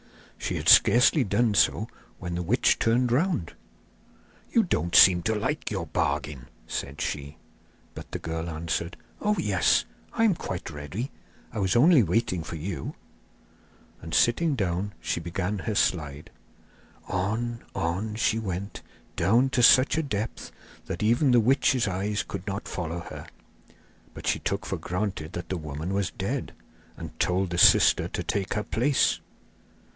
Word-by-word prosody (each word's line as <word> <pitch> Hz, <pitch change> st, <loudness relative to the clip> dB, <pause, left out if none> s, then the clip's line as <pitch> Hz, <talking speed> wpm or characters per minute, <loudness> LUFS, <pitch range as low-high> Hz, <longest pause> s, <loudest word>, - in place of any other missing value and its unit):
She -, -, -3 dB
had -, -, -4 dB
scarcely 125 Hz, +4 st, +6 dB
done 110 Hz, +1 st, +1 dB
so -, -, +2 dB, 0.3 s
when 90 Hz, -1 st, -6 dB
the 85 Hz, -, -2 dB
witch 105 Hz, +9 st, +2 dB
turned 120 Hz, +1 st, +2 dB
round. 145 Hz, -, 0 dB, 1.0 s
'You -, -, +4 dB
don't 85 Hz, +2 st, -1 dB
seem 90 Hz, -2 st, +8 dB
to 110 Hz, +5 st, 0 dB
like 105 Hz, -, -2 dB
your -, -, -3 dB
bargain,' 70 Hz, -5 st, -2 dB, 0.2 s
said 70 Hz, +1 st, -5 dB
she; 70 Hz, +1 st, -4 dB, 0.6 s
but -, -, -10 dB
the -, -, -3 dB
girl 80 Hz, +1 st, -4 dB
answered: 85 Hz, +1 st, -3 dB, 0.2 s
'Oh, 210 Hz, 0 st, +1 dB
yes, 100 Hz, -, +2 dB, 0.3 s
I 225 Hz, -, +1 dB
am 220 Hz, -4 st, +4 dB
quite 95 Hz, -, -6 dB
ready. 75 Hz, -, -6 dB, 0.4 s
I 110 Hz, -, -3 dB
was 95 Hz, -1 st, +1 dB
only 150 Hz, +4 st, +6 dB
waiting 95 Hz, -1 st, 0 dB
for 85 Hz, -, -7 dB
you!' 85 Hz, +4 st, -5 dB, 1.1 s
And 80 Hz, -1 st, -5 dB
sitting 150 Hz, +6 st, +3 dB
down 100 Hz, -1 st, -2 dB
she -, -, -2 dB
began 90 Hz, +4 st, -3 dB
her 105 Hz, +3 st, -3 dB
slide. 75 Hz, -7 st, -1 dB, 0.8 s
On, 110 Hz, +5 st, -2 dB
on, 95 Hz, +6 st, -2 dB
she 110 Hz, 0 st, +1 dB
went, 100 Hz, -1 st, -5 dB, 0.3 s
down 115 Hz, +10 st, +3 dB
to 125 Hz, -, +1 dB
such 130 Hz, +4 st, +6 dB
a -, -, -1 dB
depth 110 Hz, -6 st, -4 dB, 0.4 s
that -, -, -4 dB
even 120 Hz, +6 st, +3 dB
the 125 Hz, -1 st, +5 dB
witch's 130 Hz, 0 st, +2 dB
eyes 100 Hz, +3 st, -2 dB
could 90 Hz, -, -7 dB
not 100 Hz, +1 st, -4 dB
follow 85 Hz, -1 st, -4 dB
her; -, -, -9 dB, 0.9 s
but -, -, -9 dB
she -, -, +1 dB
took -, -, -3 dB
for -, -, -3 dB
granted 90 Hz, -4 st, -4 dB
that 85 Hz, -, -6 dB
the 95 Hz, -, -2 dB
woman 75 Hz, +3 st, -5 dB
was 100 Hz, -1 st, 0 dB
dead, -, -, -4 dB, 0.4 s
and -, -, -9 dB
told 90 Hz, 0 st, 0 dB
the 85 Hz, -, -1 dB
sister -, -, +6 dB
to -, -, -4 dB
take 95 Hz, -2 st, -2 dB
her 105 Hz, -, -1 dB
place. 125 Hz, +7 st, +1 dB
100 Hz, 155 wpm, -26 LUFS, 85-115 Hz, 1.1 s, seem